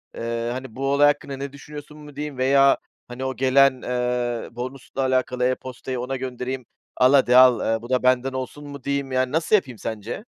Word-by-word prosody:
eee, 115 0 -3
hani, 130 -2 -7
"Bu 135 +1 -2
olay 145 +1 +5
hakkında 140 -2 -1
ne 140 0 -6
düşünüyorsun 150 +1 -11
mu" 150 -2 -13
diyeyim? 145 -2 -5
Veya, 135 +1 +4 0.3
hani, 125 +2 -6
o 130 0 -3
gelen, 135 0 +4
eee, 125 -1 -2
bonusla 130 +2 -5
alakalı 130 -1 0
e-postayı 130 0 -3
ona 125 +2 -3
göndereyim. 130 0 -5 0.3
"Al 130 +2 +5
hadi 130 -3 +5
al, 130 -2 +7 0.2
eee, 110 - -5
bu 120 - -10
da 130 -1 +1
benden 130 +1 +2
olsun" 130 +3 -6
mu 140 -2 -9
diyeyim 140 -1 -2
yani, 130 0 0
nasıl 160 +7 +2
yapayım 130 - -1
sence? 110 - -5
130 Hz, 190 wpm, -23 LUFS, 125-140 Hz, 0.3 s, al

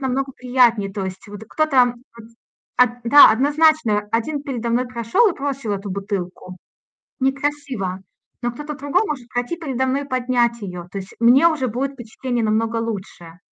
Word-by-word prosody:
намного 270 0 -2
приятнее. 240 -6 +2
То 195 -1 -4
есть 190 +3 -7
вот 205 +1 -9
и - - -11
кто-то 260 -4 +2 0.2
вот 225 -1 -13 0.5
от 245 -1 +2
да, 285 0 +9
однозначно, 275 -4 +2
один 280 +6 -1
передо 240 -5 -4
мной 250 +2 +1
прошёл 240 - +2
и - - -12
бросил 275 -6 -3
эту 200 0 -4
бутылку. 185 -2 -5 0.6
Некрасиво, 270 -8 -2 0.4
но 240 0 -1
кто-то 295 +4 -7
другой 285 +7 0
может 255 -5 -5
пройти 245 +7 -3
передо 265 -6 -2
мной 270 +2 0
и 280 - -10
поднять 245 -2 0
её. 180 -3 -6
То 200 - -5
есть 190 0 -9
мне 260 +8 +6
уже 275 -6 -1
будет 265 +5 -2
впечатление 240 -1 -4
намного 225 +2 0
лучше. 190 -6 -6
245 Hz, 170 wpm, -21 LUFS, 215-275 Hz, 0.6 s, да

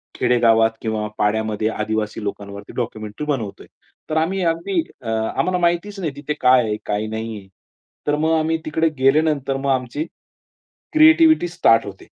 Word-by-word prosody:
खेडेगावात 115 -2 +3
किंवा 110 -1 -2
पाड्यामध्ये 110 0 0
आदिवासी 110 0 -3
लोकांवरती 100 0 -7
डॉक्युमेंटरी 110 +2 -4
बनवतोय, 120 -9 -4 0.4
तर 155 - 0
आम्ही 185 +4 0
अगदी 165 +2 0 0.2
अ, 115 - -6
आम्हाला 110 +11 0
माहितीच 175 +4 0
नाही 160 -5 -2
तिथे 150 +1 -4
काय 125 -1 +5
आहे, 105 -1 -2
काय 105 +1 -2
नाही 110 0 -5
आहे. 95 -1 -12 0.6
तर 145 - +2
मग 160 +2 0
आम्ही 160 +1 0
तिकडे 160 +1 +1
गेल्यानंतर 135 0 +2
मग 135 0 -2
आमची 130 +4 -2 0.9
क्रिएटिव्हिटी 315 - +6
स्टार्ट 140 -11 +3
होते. 95 -1 -10
130 Hz, 150 wpm, -21 LUFS, 110-160 Hz, 0.9 s, क्रिएटिव्हिटी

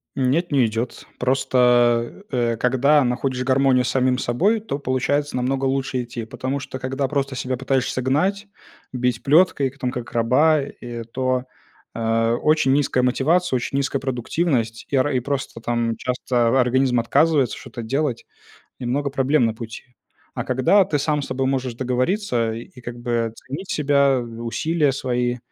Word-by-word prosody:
Нет, 140 +6 +1
не 135 -4 +4
идет. 115 +2 -4
Просто, 125 +2 +2
э, 120 -3 0
когда 135 +5 +3
находишь 125 +1 -1
гармонию 130 -1 +3
с - - -1
самим 130 0 +2
собой, 185 - +1
то 210 -9 -4
получается 140 +1 -1
намного 130 +2 -1
лучше 130 -1 -1
идти, 120 -1 -6
потому 130 +5 -4
что 130 - -7
когда 135 +1 -2
просто 140 -1 -2
себя 130 0 -2
пытаешься 130 0 -1
гнать, 185 +11 0 0.4
бить 125 -2 -1
плеткой, 145 -2 +4
к 140 +2 -20
там 125 - -1
как 125 -1 -6
раба, 130 +7 +3
э, 120 -4 -7
то, 130 +2 -1 0.5
а, 115 0 +1
очень 150 0 +2
низкая 135 -3 +1
мотивация, 145 +6 +2
очень 125 +2 -2
низкая 140 0 -1
продуктивность. 125 -2 -1
И 140 - +1
ра 135 +2 +2
и 125 - +1
просто 130 -3 -4
там 115 -1 -1
часто 125 0 0
организм 125 0 +2
отказывается 140 +2 +2
что-то 120 -2 -8
делать 130 +1 -2 0.5
и - - -5
много 140 +4 -1
проблем 135 0 +2
на 115 - 0
пути. 115 0 -8 0.5
А - - -3
когда 130 +11 +4
ты 150 -6 -1
сам 150 0 0
с - - -6
собой 130 0 -1
можешь 130 -2 -1
договориться 125 - 0
и 120 +3 -10
как 120 0 -7
бы 120 -2 -1
ценить 150 +12 -8
себя, 140 -2 +3
усилия 120 +6 -1
свои, 125 -2 -1
130 Hz, 160 wpm, -22 LUFS, 120-140 Hz, 0.5 s, не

